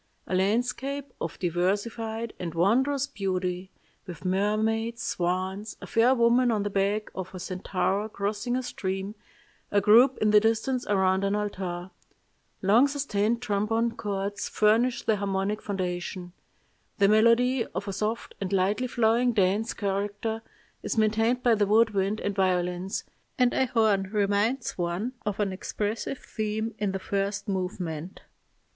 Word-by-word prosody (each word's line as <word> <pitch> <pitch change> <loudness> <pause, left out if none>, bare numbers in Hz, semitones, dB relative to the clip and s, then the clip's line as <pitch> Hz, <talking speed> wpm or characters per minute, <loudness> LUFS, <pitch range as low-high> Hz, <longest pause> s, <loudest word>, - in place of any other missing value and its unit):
A - - -5
landscape 245 +8 0
of 165 - -4
diversified 215 +6 -1
and 170 -2 -5
wondrous 260 +10 +2
beauty, 185 -6 -3 0.4
with 180 0 -9
mermaids, 220 +5 0
swans, 185 +4 -2
a - - -8
fair 240 +3 +3
woman 240 +1 +4
on 215 -3 +1
the 205 - -3
back 200 +2 0
of 185 0 -6
a - - -6
centaur 190 +3 -1
crossing 210 +4 -2
a 255 - -1
stream, 195 -3 -4 0.6
a 205 - +3
group 235 +6 +6
in 215 0 +2
the 210 - +8
distance 225 +4 0
around 190 -1 +2
an 200 +1 +1
altar. 190 -3 -4 0.7
Long 220 +8 +5
sustained 235 -5 -1
trombone 225 +2 0
chords 200 -1 -3
furnish 230 +4 +2
the 220 - +2
harmonic 200 +1 -1
foundation. 180 -2 -4 0.6
The 200 - +5
melody, 230 +3 +4
of 190 +4 -5
a 195 - -3
soft 215 +4 -3
and 195 -1 -3
lightly 200 +6 +1
flowing 240 +1 +2
dance 205 +2 +2
character, 205 +3 -2 0.4
is - - -3
maintained 225 +3 +2
by 240 - +5
the 205 -2 +2
wood 225 +2 +4
wind 200 +1 0
and 205 - -1
violins, 180 -1 0 0.3
and 250 -2 +3
a 260 - +2
horn 215 -5 +2
reminds 210 +3 0
one 175 +8 -2
of 205 -1 -2
an 200 -2 0
expressive 210 +7 -3
theme 220 0 -3
in 205 -2 0
the 195 - -2
first 195 +1 -2
movement. 180 -3 -4
205 Hz, 145 wpm, -27 LUFS, 190-230 Hz, 0.7 s, the